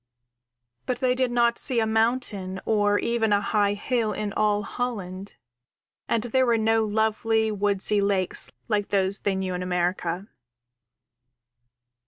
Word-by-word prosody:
But 255 - -1
they 255 -1 +2
did 255 0 0
not 235 -1 +2
see 250 -3 0
a 225 - +2
mountain 220 -4 0
or 205 -1 +2
even 230 -1 0
a 205 - +4
high 205 0 +1
hill 225 0 -1
in 205 -1 -3
all 210 -1 +1
Holland, 200 -5 -5 0.7
and 230 -2 0
there 255 +2 +1
were 235 -1 +3
no 225 0 +2
lovely, 220 +1 +1
woodsy 205 0 +1
lakes 195 -2 +1 0.2
like 205 -2 0
those 195 0 +1
they 200 -1 -1
knew 190 -1 -2
in 180 - -3
America. 180 +1 -2
210 Hz, 140 wpm, -25 LUFS, 200-230 Hz, 0.7 s, a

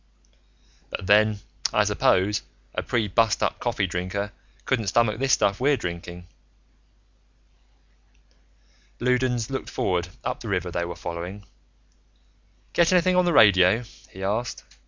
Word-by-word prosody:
"But - - -5
then, 105 +1 +4 0.3
I - - +3
suppose, 100 +3 +2 0.3
a - - -2
pre 115 -3 -1
bustup 110 +2 +1
coffee 115 -5 -1
drinker 95 +3 -3 0.3
couldn't 115 -6 0
stomach 115 +2 +2
this 135 0 +1
stuff 100 -5 +2
we're 140 +2 +3
drinking." 85 -2 -6 2.7
Loudons 125 -1 0
looked 135 - -4
forward, 90 -1 -1 0.2
up - - -3
the - - -7
river 90 0 -1
they 85 0 -2
were 85 0 -6
following. 90 +4 -6 1.3
"Get 170 0 +3
anything 185 0 +3
on 180 0 +4
the 175 - +2
radio?" 100 - +5 0.3
he 95 - -9
asked. 110 +5 -2
105 Hz, 125 wpm, -25 LUFS, 90-125 Hz, 2.7 s, radio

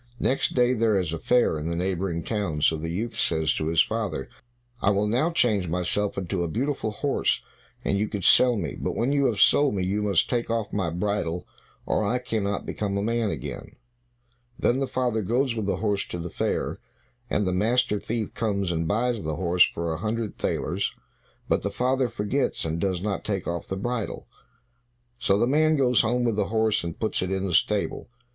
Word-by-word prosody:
Next 135 - +1
day 125 0 +4
there 110 -3 +2
is 90 -4 -1
a 85 - -3
fair 120 -10 +2
in 75 +2 -3
the 85 - -2
neighboring 90 -1 -1
town, 100 -9 -2
so 80 - +4
the 80 +1 -4
youth 110 +8 -3
says 80 -2 +1
to 75 - -2
his 80 0 +4
father, 110 -11 -3 0.5
"I - - +3
will 100 +1 +2
now 125 +10 +2
change 110 - +2
myself 90 +5 0
into 95 -1 -2
a 85 - 0
beautiful 125 - -1
horse, 135 - 0 0.4
and 100 - +1
you 105 - +1
can 100 -3 -4
sell 125 +5 +6
me; 85 -8 -3
but - - -2
when 120 +4 +1
you 140 -1 +3
have 105 -4 -1
sold 145 +2 +5
me, 95 -2 0
you 100 +3 0
must 100 -5 +2
take 120 -2 -1
off 115 -2 -2
my 95 -4 0
bridle, 90 -1 -2 0.4
or - - +1
I 110 +5 +1
cannot 110 -5 -2
become 100 -2 -2
a 100 - -1
man 115 0 0
again." - - -6 0.8
Then 125 +2 +2
the 135 - 0
father 120 -4 0
goes 120 +5 +1
with 110 -3 -3
the - - +1
horse 105 -2 0
to - - -5
the 85 0 -5
fair, - - -2 0.5
and 105 - +1
the 90 - 0
master 110 +3 +2
thief 110 +1 -3
comes 100 -5 -1
and 80 -1 -1
buys 115 +4 0
the 80 -1 -3
horse 90 0 +4
for 85 -1 -3
a - - -3
hundred 110 +2 -2
thalers, 90 +5 -2 0.5
but - - +2
the - - -2
father 130 0 +1
forgets, 115 +2 -1
and 80 +1 -2
does 95 -2 -1
not 100 -2 -2
take 100 -3 -2
off 85 -1 -3
the 95 - -3
bridle. 120 +1 -3 0.9
So 100 -6 +2
the 110 - +3
man 155 +4 +3
goes 125 -5 +4
home 120 +2 +1
with 115 -3 0
the 100 -2 +1
horse, 110 -1 +1
and 85 -1 -5
puts 110 - 0
it 95 - -1
in 95 0 -1
the 90 - -2
stable. 105 +7 +1
105 Hz, 205 wpm, -26 LUFS, 90-120 Hz, 0.9 s, sell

